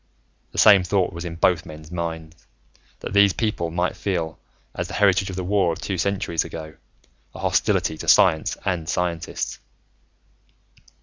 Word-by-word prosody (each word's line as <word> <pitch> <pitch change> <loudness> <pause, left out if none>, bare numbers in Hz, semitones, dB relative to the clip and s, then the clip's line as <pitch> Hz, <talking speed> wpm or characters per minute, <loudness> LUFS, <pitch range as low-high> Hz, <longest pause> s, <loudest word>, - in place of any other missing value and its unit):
The - - -11
same 100 -3 +7
thought 95 0 0
was 85 +1 -6
in 85 -1 -5
both 85 0 +2
men's 75 +1 -11
minds, 80 -1 -6 0.5
that - - -6
these 100 -1 +5
people 105 -7 -1
might 90 +2 -1
feel, 85 -5 -3 0.3
as - - -4
the - - -7
heritage 95 -1 +3
of 95 - -6
the 95 - -3
war 95 -2 +2
of 80 - -5
two 95 -3 -3
centuries 90 -3 0
ago, 80 -1 -8 0.6
a - - -8
hostility 80 - +1
to - - -7
science 80 - +4
and 85 -4 -2
scientists. 85 -2 -2
90 Hz, 160 wpm, -23 LUFS, 80-95 Hz, 0.6 s, same